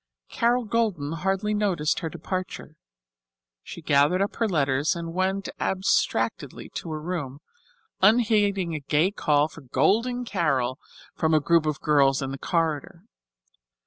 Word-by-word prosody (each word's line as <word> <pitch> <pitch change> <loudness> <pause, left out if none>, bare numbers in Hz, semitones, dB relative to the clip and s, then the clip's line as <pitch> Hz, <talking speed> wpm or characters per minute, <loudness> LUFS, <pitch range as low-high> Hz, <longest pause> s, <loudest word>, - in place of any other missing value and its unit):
Carol 240 +1 +1
Golden 205 -10 -1
hardly 195 +5 -1
noticed 190 -8 0
her 165 - -4
departure. 185 +3 -6 0.9
She 170 - -10
gathered 145 +4 +3
up 200 +1 -2
her 230 - +1
letters 140 -1 +1
and 165 -1 -6
went 190 +2 -1
abstractedly 190 +1 -1
to 170 - -7
her 155 -1 -4
room, 150 -5 -4 0.6
unheeding 205 -4 +3
a 155 - -3
gay 150 +6 +1
call 150 -6 +2
for 160 - -13
"Golden 220 - +1
Carol" 135 - 0 0.3
from 160 0 +1
a - - +5
group 165 +1 +2
of 150 0 -2
girls 140 -3 +3
in 135 - -4
the 135 - -6
corridor. 160 -4 -2
170 Hz, 140 wpm, -25 LUFS, 150-195 Hz, 0.9 s, a